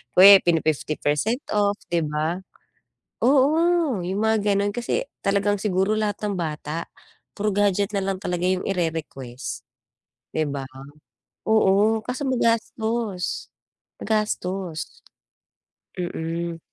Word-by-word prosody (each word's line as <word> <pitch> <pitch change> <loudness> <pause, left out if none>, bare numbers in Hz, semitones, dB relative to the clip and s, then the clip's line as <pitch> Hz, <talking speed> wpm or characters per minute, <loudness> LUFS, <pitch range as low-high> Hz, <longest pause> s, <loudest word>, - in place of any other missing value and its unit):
pini 185 -3 +8
50% 155 - 0
off 205 -1 +2 0.2
di 170 -1 +2
ba? 155 +4 -1 0.9
Oo, 300 - +3
yung 195 +3 -2
mga 220 0 +3 0.2
ganon, 200 0 +1
kasi 240 - -1 0.2
talagang 200 +1 +2
siguro 195 +1 +1
lahat 210 -1 -1
ng 205 - -1
bata, 155 0 -4 0.5
puro 210 +1 0
gadget 205 0 +1
nalang 195 -1 -1
talaga 180 -1 -2
yung 185 0 +1
i-rerequest, 155 -8 -4 0.7
di 155 - +1
ba? 140 -1 -4 0.8
Oo, 215 +1 +4
kaso 255 +5 -4
magastos. 230 -4 -1 0.5
Magastos. 190 -6 -1 1.2
Mm. 170 -1 -3
195 Hz, 100 wpm, -24 LUFS, 170-220 Hz, 1.2 s, pini